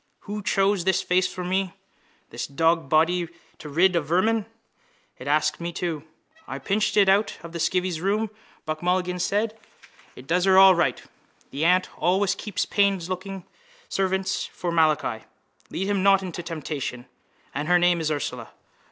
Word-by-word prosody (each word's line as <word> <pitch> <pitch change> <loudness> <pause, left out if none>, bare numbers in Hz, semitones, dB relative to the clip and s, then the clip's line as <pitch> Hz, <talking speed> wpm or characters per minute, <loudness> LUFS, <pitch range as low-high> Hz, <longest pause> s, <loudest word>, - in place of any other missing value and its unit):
Who 210 +1 -5
chose 195 -2 +1
this 190 0 +1
face 180 +1 +1
for 180 - -6
me? 185 0 -1 0.6
This - - -4
dogsbody 165 +3 +2 0.3
to 150 - -8
rid 175 +5 +3
of 160 -4 0
vermin. 210 +6 +1 0.7
It 125 - -8
asks 150 +1 +1
me 170 0 -4
too. 165 -3 -4 0.4
—I - - -5
pinched 210 +2 0
it 200 -2 +6
out 200 +2 +2
of 170 - -8
the 170 - -6
skivvy's 180 -1 0
room, 210 +3 0 0.3
Buck 155 0 -3
Mulligan 180 0 0
said. 210 +5 0 0.6
It 125 - -12
does 180 +5 +1
her 190 -1 +5
all 190 0 +9
right. 170 -1 0 0.5
The 145 +4 -1
aunt 185 +1 +4
always 190 +4 +2
keeps 200 -1 -3
plainlooking 190 -1 -1 0.4
servants 190 0 -1
for 175 - -4
Malachi. 160 -2 +1 0.4
Lead 190 - -3
him 200 -2 +1
not 195 0 +4
into 180 -2 -5
temptation. 150 -7 -5 0.5
And 145 +2 -3
her 180 0 +5
name 175 -1 +3
is 155 - 0
Ursula. 150 -2 -3
180 Hz, 160 wpm, -25 LUFS, 165-195 Hz, 0.7 s, all